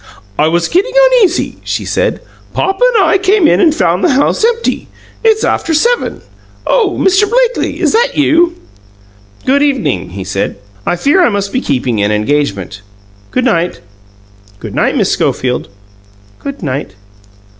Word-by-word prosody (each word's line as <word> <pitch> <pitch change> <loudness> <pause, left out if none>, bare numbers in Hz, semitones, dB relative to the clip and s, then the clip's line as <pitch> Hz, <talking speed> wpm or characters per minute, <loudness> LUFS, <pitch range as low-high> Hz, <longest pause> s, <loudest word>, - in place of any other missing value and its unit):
"I 150 - +4
was 170 +1 +1
getting 400 +8 0 0.2
uneasy," 410 -8 +1
she - - -3
said. - - -1 0.3
"Papa 385 +5 0
and 410 - +4
I 390 - +3
came 390 -3 +3
in - - +3
and 335 -4 +5
found 180 - 0
the - - +3
house 285 +9 +1
empty. 465 0 0 0.4
It's 440 -1 +3
after 325 - 0
seven. 475 +9 0 0.4
Oh, 430 -7 +1
Mr. 385 +2 +3
Blakely, - - 0
is - - +1
that 485 +3 +1
you?" 335 +3 +3 0.9
"Good 275 +2 +2
evening," 270 - 0
he 95 +1 -7
said. 95 +1 -3 0.3
"I - - +1
fear 285 - +2
I - - +4
must 200 -2 -3
be 255 - 0
keeping 125 - -1
an 100 +1 +1
engagement. 105 - -1 0.5
Good 255 - -1
night. 175 -7 0 0.8
Good - - -8
night, - - 0
Miss - - +1
Schofield." 125 -6 -1 0.7
"Good 280 -7 -7
night." 135 -8 -4
280 Hz, 155 wpm, -13 LUFS, -, 0.9 s, and